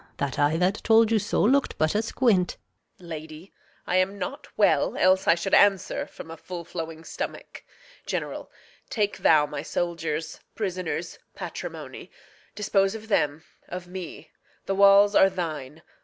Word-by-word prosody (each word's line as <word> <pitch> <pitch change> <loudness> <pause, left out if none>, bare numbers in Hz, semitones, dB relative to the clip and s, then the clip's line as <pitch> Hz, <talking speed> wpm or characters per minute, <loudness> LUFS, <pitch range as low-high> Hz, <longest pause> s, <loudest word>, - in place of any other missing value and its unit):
That 140 -2 -3
eye 145 +2 +3
that 185 +4 +1
told 225 0 +5
you 225 - +4
so 205 - 0
look'd 270 +6 +2
but 155 +5 +1
asquint. 220 -4 +1 0.4
Reg. 175 - -14
Lady, 155 +2 -9 0.3
I 180 - +1
am 190 +2 +1
not - - -5
well; - - +3
else 185 +1 +3
I 170 - +6
should 185 +3 -4
answer 200 -3 +3
From 160 - -11
a 165 - -8
full 175 0 -7
flowing 165 -1 -6
stomach. - - -7 0.4
General, - - -4 0.4
Take 210 -5 -1
thou 155 -2 +5
my 145 -1 -5
soldiers, 165 -1 -3 0.2
prisoners, 185 -4 -4 0.2
patrimony; - - -7 0.5
Dispose 195 -1 +1
of 220 0 -9
them, 150 -5 +1 0.2
of 180 0 -7
me; 180 -2 -8 0.3
the 195 - -1
walls 200 +1 +6
are 195 - +6
thine. 160 -5 -5
180 Hz, 150 wpm, -26 LUFS, 160-200 Hz, 0.5 s, I